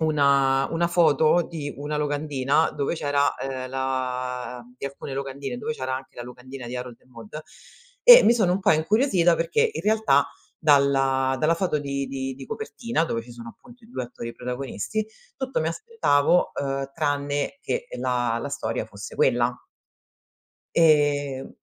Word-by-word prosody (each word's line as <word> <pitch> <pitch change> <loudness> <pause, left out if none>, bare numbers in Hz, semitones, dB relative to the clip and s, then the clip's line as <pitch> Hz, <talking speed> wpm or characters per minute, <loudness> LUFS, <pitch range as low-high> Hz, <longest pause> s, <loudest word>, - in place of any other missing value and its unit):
una 140 -3 +3
una 170 +1 +1
foto 165 -1 +4
di 150 -4 -6
una 145 +1 -4
locandina, 145 0 0
dove 145 +2 -2
c'era, 145 -2 +1
ehm, 130 -1 -5
la 125 -1 -3
di 130 - -8
alcune 140 0 -7
locandine, 140 - -5
dove 230 0 -3
c'era 130 - -3
anche 130 0 -8
la 120 - -6
locandina 125 +1 -10
di 125 +1 -5
Harold 125 -1 -7
e - - -29
Maude 120 +4 -10 0.6
e - - +10
mi - - +6
sono 210 -7 +2
un 190 - -1
po' 190 - +4
incuriosita, 175 - +3
perché 450 - +1
in - - -4
realtà 210 -10 +3 0.4
dalla 135 -3 +3
dalla 155 +2 +3
foto 170 -3 0
di 140 -1 -3
di 135 -1 -4
di 135 0 -10
copertina, 235 - -2
dove 115 -8 -2
ci 120 - -14
sono 120 -1 -10
appunto 240 - -19
i 225 - -18
2 130 - -4
attori 120 -1 -8
protagonisti, 125 - -4 0.3
tutto 265 -7 -2
mi 160 - 0
aspettavo, 180 - +1
uhm, 135 -1 -3
tranne 145 - -1
che 485 0 -3
la 120 -2 0
la 140 - -4
storia 110 -5 -3
fosse 105 -1 -9
quella. 120 -1 +2 1.2
Ehm, 145 -4 +2
140 Hz, 160 wpm, -24 LUFS, 130-165 Hz, 1.2 s, e